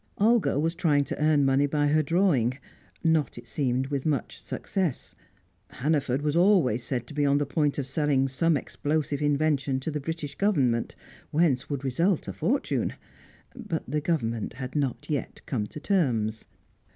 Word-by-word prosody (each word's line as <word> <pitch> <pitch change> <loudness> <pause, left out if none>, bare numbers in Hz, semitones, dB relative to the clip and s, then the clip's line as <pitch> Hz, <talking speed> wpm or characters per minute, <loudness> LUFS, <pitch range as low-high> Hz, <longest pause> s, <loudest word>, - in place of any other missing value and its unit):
Olga 225 -5 +3
was 165 +2 +1
trying 150 -5 +2
to 140 - -5
earn 150 -2 +4
money 135 +1 +3
by 145 +1 +1
her 155 +1 +4
drawing, 145 - +2 0.5
not, 160 -5 +1
it 120 - -9
seemed, 130 0 -1
with 140 -2 -2
much 145 -6 -2
success. 185 -9 -3 0.5
Hannaford 140 -2 -1
was 150 0 0
always 170 - +4
said 125 -1 -3
to 120 - -10
be 145 0 0
on 140 0 +3
the 145 - +1
point 145 +1 0
of 140 - -1
selling 140 -1 +1
some 155 +4 +2
explosive 145 +1 -2
invention 145 -2 +1
to 160 - -3
the 150 -1 -3
British 155 -1 -4
Government, 135 - +1 0.3
whence 145 -4 +1
would 140 -2 -3
result 165 +7 +1
a 95 - -4
fortune; 95 - 0 0.6
but - - -4
the 150 +4 -1
Government 115 -10 -1
had 130 +2 -7
not 140 -4 -1
yet 145 -4 -3
come 110 -6 -2
to 150 - -9
terms. 120 - 0
145 Hz, 165 wpm, -27 LUFS, 130-155 Hz, 0.6 s, earn